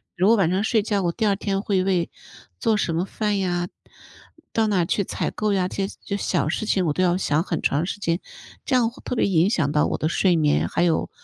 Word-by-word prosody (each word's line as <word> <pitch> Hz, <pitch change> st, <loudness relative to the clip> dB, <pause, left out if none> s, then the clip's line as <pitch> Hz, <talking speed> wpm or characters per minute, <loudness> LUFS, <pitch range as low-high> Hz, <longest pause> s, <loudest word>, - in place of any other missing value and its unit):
如 185 Hz, +2 st, +2 dB
果 230 Hz, -, +6 dB
晚 185 Hz, -5 st, +3 dB
上 190 Hz, +3 st, 0 dB
睡 220 Hz, 0 st, +2 dB
觉， 205 Hz, -1 st, -1 dB
我 175 Hz, -, +1 dB
第 220 Hz, +6 st, -2 dB
2 200 Hz, -1 st, +3 dB
天 195 Hz, -1 st, -2 dB
会 195 Hz, -3 st, +1 dB
为 185 Hz, -3 st, 0 dB, 0.5 s
做 225 Hz, -3 st, +2 dB
什 170 Hz, -5 st, -1 dB
么 170 Hz, -, +1 dB
饭 210 Hz, +1 st, -2 dB
呀， 175 Hz, -2 st, -1 dB, 0.9 s
到 220 Hz, -1 st, +2 dB
哪 205 Hz, -2 st, +1 dB
儿 170 Hz, -, +2 dB
去 200 Hz, -, 0 dB
采 -, -, -3 dB
购 215 Hz, -1 st, -1 dB
呀， 190 Hz, -2 st, +1 dB
这 195 Hz, +1 st, -2 dB
些 -, -, -10 dB
这 200 Hz, -, -2 dB
些 200 Hz, -, -4 dB
小 -, -, 0 dB
事 215 Hz, -, -2 dB
情， 190 Hz, -4 st, +1 dB
我 155 Hz, -, +1 dB
都 185 Hz, -, 0 dB
要 180 Hz, 0 st, +2 dB
想 155 Hz, -4 st, +1 dB
很 175 Hz, -3 st, -3 dB
长 145 Hz, +4 st, +1 dB
时 195 Hz, -, -5 dB
间， 170 Hz, -3 st, 0 dB, 0.5 s
这 -, -, -2 dB
样 235 Hz, -2 st, +2 dB
会 235 Hz, -, -16 dB
特 -, -, -3 dB
别 -, -, +3 dB
影 180 Hz, -1 st, +3 dB
响 165 Hz, -9 st, +1 dB
到 150 Hz, -, +3 dB
我 -, -, -2 dB
的 155 Hz, -, -1 dB
睡 175 Hz, +2 st, +2 dB
眠。 150 Hz, -2 st, +2 dB
还 170 Hz, -, 0 dB
有， 165 Hz, -2 st, +1 dB
190 Hz, 280 characters per minute, -23 LUFS, 170-205 Hz, 0.9 s, 果